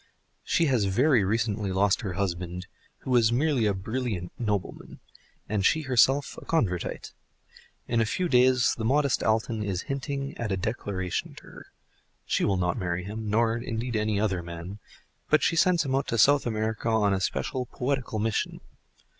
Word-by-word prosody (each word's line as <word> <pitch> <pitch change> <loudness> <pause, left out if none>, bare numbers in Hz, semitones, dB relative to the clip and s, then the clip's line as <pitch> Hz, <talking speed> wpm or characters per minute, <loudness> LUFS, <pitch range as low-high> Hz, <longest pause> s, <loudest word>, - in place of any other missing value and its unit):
She 170 - +2
has 125 -8 +2
very 120 +4 +3
recently 105 -1 -1
lost 100 +3 +2
her 95 -6 -4
husband, 90 -1 -3 0.4
who 130 - -5
was 120 -2 +4
merely 130 -2 +2
a 100 - +2
brilliant 105 -3 -3
nobleman, 105 -5 -3 0.5
and 105 -1 -1
she 155 +9 +3
herself 135 +2 +2
a - - -13
Convertite; 100 - -1 0.7
in 115 -1 +1
a - - +2
few 180 +10 -1
days 130 -3 +4
the 115 - -5
modest 140 +3 +2
Alton 110 0 0
is 95 -3 -2
hinting 140 0 -4
at 115 -3 -2
a 95 - 0
declaration 95 -3 -3
to - - -13
her. - - -13 0.6
She - - 0
will 100 - +2
not 90 -1 0
marry 90 -1 -2
him, 105 +3 -5
nor 115 +1 +2
indeed 120 0 -4
any 105 -1 0
other 95 -4 0
man, 85 +4 -8 0.5
but 155 - +4
she - - +2
sends 175 -2 +3
him 135 - -2
out 135 +1 0
to 115 - -1
South 140 +4 +4
America 110 0 -2
on 105 -3 +2
a 95 - -1
special 120 - -2
poetical 130 -3 -2
mission. 110 0 -1
110 Hz, 170 wpm, -27 LUFS, 100-130 Hz, 0.7 s, was